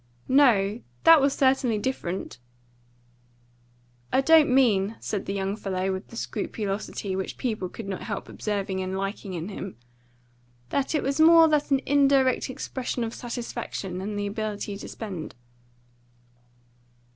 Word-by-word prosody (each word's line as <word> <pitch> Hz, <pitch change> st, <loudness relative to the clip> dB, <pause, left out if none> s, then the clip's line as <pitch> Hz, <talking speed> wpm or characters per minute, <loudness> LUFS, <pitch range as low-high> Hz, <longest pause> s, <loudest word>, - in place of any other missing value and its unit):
"No, 235 Hz, -6 st, +4 dB, 0.2 s
that 325 Hz, -2 st, +8 dB
was 275 Hz, +1 st, +3 dB
certainly 260 Hz, -4 st, +2 dB
different." 195 Hz, -, -4 dB, 1.7 s
"I -, -, +3 dB
don't 320 Hz, +1 st, +6 dB
mean," 225 Hz, -5 st, +3 dB
said 205 Hz, -2 st, -4 dB
the 195 Hz, -, -2 dB
young 195 Hz, 0 st, -2 dB
fellow, 190 Hz, -2 st, -2 dB
with 190 Hz, +1 st, -6 dB
the -, -, -12 dB
scrupulosity 205 Hz, -3 st, -3 dB
which 190 Hz, 0 st, -4 dB
people 215 Hz, -7 st, -2 dB
could 215 Hz, +2 st, -8 dB
not 195 Hz, -2 st, -4 dB
help 205 Hz, -3 st, -5 dB
observing 200 Hz, -3 st, -3 dB
and 185 Hz, 0 st, -3 dB
liking 195 Hz, -1 st, -4 dB
in 170 Hz, +3 st, -4 dB
him, 195 Hz, -, -7 dB, 0.9 s
"that 280 Hz, +3 st, 0 dB
it 300 Hz, -, +1 dB
was 280 Hz, +2 st, -1 dB
more 330 Hz, +1 st, +8 dB
than 300 Hz, -2 st, +3 dB
an 270 Hz, -1 st, +3 dB
indirect 275 Hz, -3 st, +3 dB
expression 255 Hz, -1 st, -4 dB
of 225 Hz, 0 st, -4 dB
satisfaction 230 Hz, -6 st, -5 dB
in 205 Hz, +2 st, -4 dB
the 205 Hz, 0 st, -2 dB
ability 205 Hz, -1 st, -4 dB
to 200 Hz, -, -8 dB
spend." 190 Hz, -8 st, -7 dB
215 Hz, 140 wpm, -26 LUFS, 195-265 Hz, 1.7 s, that